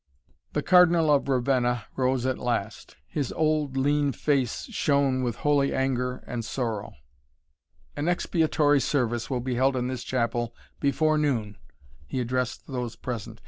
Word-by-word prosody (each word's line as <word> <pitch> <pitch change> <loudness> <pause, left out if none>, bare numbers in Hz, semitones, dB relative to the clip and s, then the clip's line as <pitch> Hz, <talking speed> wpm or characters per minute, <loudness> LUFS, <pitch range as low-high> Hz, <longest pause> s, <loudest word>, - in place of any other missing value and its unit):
The - - -1
Cardinal 175 -4 +5
of 140 -1 +1
Ravenna 125 -3 +1
rose 130 -1 +1
at 130 -1 -1
last. 110 -3 -3
His 140 - -3
old, 155 -3 0
lean 145 +1 +2
face 135 -6 0
shone 140 - +2
with 120 -2 -1
holy 145 -2 +1
anger 125 -1 -1
and 120 -1 -4
sorrow. 115 -3 -3 1.0
"An 145 +2 -2
expiatory 155 -4 +2
service 120 -4 0
will 125 -3 -1
be 130 +1 -2
held 130 +2 +2
in 125 0 -1
this 130 -2 -4
chapel 120 -2 -1 0.2
before 155 +2 +2
noon," 115 -9 0 0.5
he 130 - -3
addressed 125 +1 -2
those 125 -4 -4
present. 115 -2 -6
130 Hz, 140 wpm, -26 LUFS, 120-145 Hz, 1.0 s, Cardinal